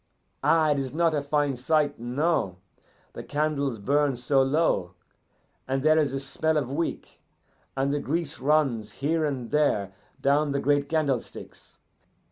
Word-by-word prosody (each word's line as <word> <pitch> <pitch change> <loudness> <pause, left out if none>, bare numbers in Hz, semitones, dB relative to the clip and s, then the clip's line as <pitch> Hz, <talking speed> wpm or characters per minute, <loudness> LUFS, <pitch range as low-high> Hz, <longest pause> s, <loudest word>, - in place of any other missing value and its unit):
Ah, 160 -2 +4
it 145 - +1
is 135 +1 -4
not 165 -1 +2
a 145 - 0
fine 145 -1 0
sight 145 +2 0
no. 125 - -1 0.6
The - - -7
candles 145 -4 -1
burn 140 +6 +1
so 130 +3 +2
low, 135 - +1 0.7
and 135 0 -1
there 155 +1 +5
is 145 -4 +1
a 135 - -2
smell 155 +3 0
of 135 -3 -2
wick, 165 +4 -4 0.6
and 135 +1 +1
the 145 - 0
grease 160 +1 -3
runs 135 -5 +1
here 155 +4 -1
and 130 -6 -4
there 105 -10 +1 0.3
down 145 +1 +2
the 140 - 0
great 145 0 +1
candlesticks. 145 -6 -3
145 Hz, 150 wpm, -26 LUFS, 135-155 Hz, 0.7 s, there